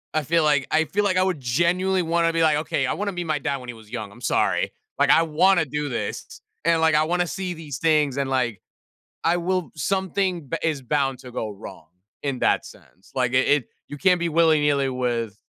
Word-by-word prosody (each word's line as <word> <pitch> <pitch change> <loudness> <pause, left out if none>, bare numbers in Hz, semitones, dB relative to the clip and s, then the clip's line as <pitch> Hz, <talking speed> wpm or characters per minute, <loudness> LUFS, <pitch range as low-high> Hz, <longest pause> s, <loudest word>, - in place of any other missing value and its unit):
I 155 - +1
feel 165 +3 +2
like 145 -4 +2
I 160 +1 +3
feel 205 +6 -1
like 185 -2 +1
I - - +4
would 185 -6 -1
genuinely 175 +9 +1
wanna 165 0 +1
be 165 - +1
like, 155 -2 +4
"Okay, 150 -3 -1
I - - 0
wanna 205 0 -2
meet 175 -1 -4
my 155 -2 0
dad 140 +1 -2
when 125 -2 -10
he 120 - -4
was 110 -2 -16
young, 110 -4 -6
I'm 120 - -16
sorry." - - +1 0.3
like, - - +3
"I 165 - +6
wanna 165 +2 +3
do 150 +1 -3
this," 120 - -5 0.2
and, 165 0 +3
like, 160 -1 +3
"I 150 +1 +4
wanna 175 +2 +1
see 180 0 -4
these 150 -4 -7
things," 150 -4 +2
and, 140 -1 -1
like, 125 -5 -1 0.6
"I 170 +2 +2
will" 180 0 -1
Something 185 -2 -1
b 165 - -1
is 155 -4 0
bound 135 0 -1
to 125 - -11
go 110 -2 -4
wrong 95 -5 -11 0.3
in 135 -3 -2
that - - +2
sense, 95 - -17
like, 125 -2 0
it 130 +1 +3
it 145 -5 +2 0.2
you 145 - -7
can't 180 +1 +3
be 170 - -1
willy-nilly 150 -4 +3
with 120 -4 -2
150 Hz, 225 wpm, -23 LUFS, 130-170 Hz, 0.6 s, I